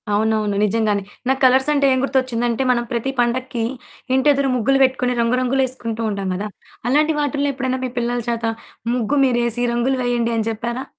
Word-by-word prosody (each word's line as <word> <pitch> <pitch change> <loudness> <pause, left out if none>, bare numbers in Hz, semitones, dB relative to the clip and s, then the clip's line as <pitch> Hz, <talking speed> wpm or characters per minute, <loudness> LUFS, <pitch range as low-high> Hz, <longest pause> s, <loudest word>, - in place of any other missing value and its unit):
అవునవును. 215 -1 +1
నిజంగానే. 210 -1 +1 0.3
నాకు 265 0 +1
కలర్సంటే 265 +3 +4
ఏం 260 - +1
గుర్తొచ్చిందంటే, 255 -2 0
మనం 240 -1 +1
ప్రతి 240 +2 -1
పండక్కి 240 0 0 0.5
ఇంటియెదురు 275 0 +3
ముగ్గులు 250 +3 +2
బెట్టుకొని, 255 -1 +1
రంగు 235 +2 +1
రంగులేసుకుంటూ 255 -3 -1
ఉంటాం 195 -1 -3
గదా! 205 +3 -3 0.4
అలాంటి 305 +4 +3
వాటిల్లో 285 -1 0
ఎప్పుడన్నా 260 -1 -2
మీ 250 - -4
పిల్లల 240 0 -1
చేత, 230 -1 -2 0.5
ముగ్గు 250 +4 0
మీరేసి 240 -1 +1
"రంగులు 255 +2 0
వెయ్యండి" 240 -1 0
అని 220 0 -1
జెప్పారా? 235 +4 -4
245 Hz, 155 wpm, -20 LUFS, 230-265 Hz, 0.5 s, కలర్సంటే